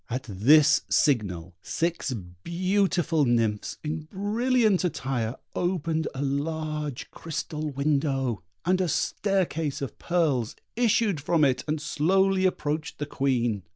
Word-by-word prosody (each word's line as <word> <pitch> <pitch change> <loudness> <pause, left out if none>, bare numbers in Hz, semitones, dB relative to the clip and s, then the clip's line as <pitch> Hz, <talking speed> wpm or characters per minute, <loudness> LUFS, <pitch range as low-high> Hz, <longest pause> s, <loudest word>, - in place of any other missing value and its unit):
At 125 +2 -3
this 140 +9 +5
signal 95 - +1
six 170 - -2 0.3
beautiful 180 -3 +1
nymphs, 115 -4 0
in 155 0 -4
brilliant 215 +1 +2
attire, 130 -8 -2 0.2
opened 165 -3 -1
a 135 - -2
large 150 0 -3
crystal 155 -1 -4
window, 140 -4 0 0.2
and 185 +1 +2
a 185 - +1
staircase 165 -3 0
of 140 - -6
pearls 150 -10 0 0.2
issued 220 -7 +2
from 155 0 +3
it 130 -2 +1
and 155 0 -1
slowly 190 +5 +2
approached 155 -3 -3
the 145 - -3
Queen. 120 -7 0
155 Hz, 120 wpm, -26 LUFS, 135-175 Hz, 0.3 s, this